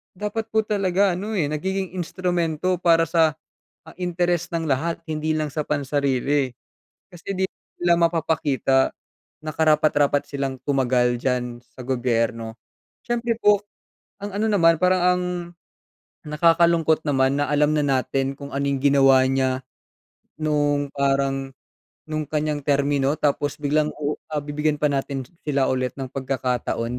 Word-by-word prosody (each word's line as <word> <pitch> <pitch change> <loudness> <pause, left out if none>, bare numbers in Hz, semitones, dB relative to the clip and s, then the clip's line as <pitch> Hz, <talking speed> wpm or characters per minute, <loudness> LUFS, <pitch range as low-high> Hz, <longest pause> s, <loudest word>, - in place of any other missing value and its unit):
dapat 215 +3 -3
po 220 0 +2
talaga 195 -2 +2
ano 205 +4 -5
eh, 155 -6 +1
nagiging 190 +4 -3
instrumento 175 -1 -1
para 165 -2 +4
sa, 160 -2 +3 0.5
ah, 160 - -13
interes 175 -1 0
ng 165 -1 -1
lahat 165 +5 -1
hindi 155 0 -1
lang 155 -1 -1
sa 150 +2 -2
pansarili. 140 -1 0 0.6
Kasi 180 +3 -6
di 190 +1 0 0.4
nila 175 -1 +4
mapapakita 155 -6 +1 0.5
na 155 - -4
karapat-rapat 150 -2 +3
silang 135 -2 -3
tumagal 125 -3 +2
diyan 125 -1 -2
sa 130 - -16
gobyerno. 115 -3 -1 0.5
Siyempre 240 -1 0
po, 205 -1 +4 0.6
ang 205 - -4
ano 215 +2 0
naman, 165 -5 +4
parang 185 0 +3
ang 180 0 +3 1.0
nakakalungkot 165 0 +3
naman 135 0 +2
na - - -1
alam 150 +1 +2
na 150 - +2
natin 135 0 0
kung 140 -1 -9
ano 140 +1 -1
yung 135 -1 -1
ginawa 135 -2 +5
niya 130 0 0 0.8
noong 145 -2 0
parang 135 -1 0 0.6
nung 155 -1 -3
kanyang 150 0 -1
termino 140 0 +2
tapos 145 -1 0
biglang 150 +1 +1
uu 150 0 -3 0.2
ah, 150 - -1
bibigyan 150 +1 -1
pa 150 -1 +2
natin 135 -1 -2 0.2
sila 140 -3 +1
ulit 130 -1 -1
ng 135 -2 -6
pagkakataon, 125 -3 -2
150 Hz, 140 wpm, -23 LUFS, 135-170 Hz, 1.0 s, ginawa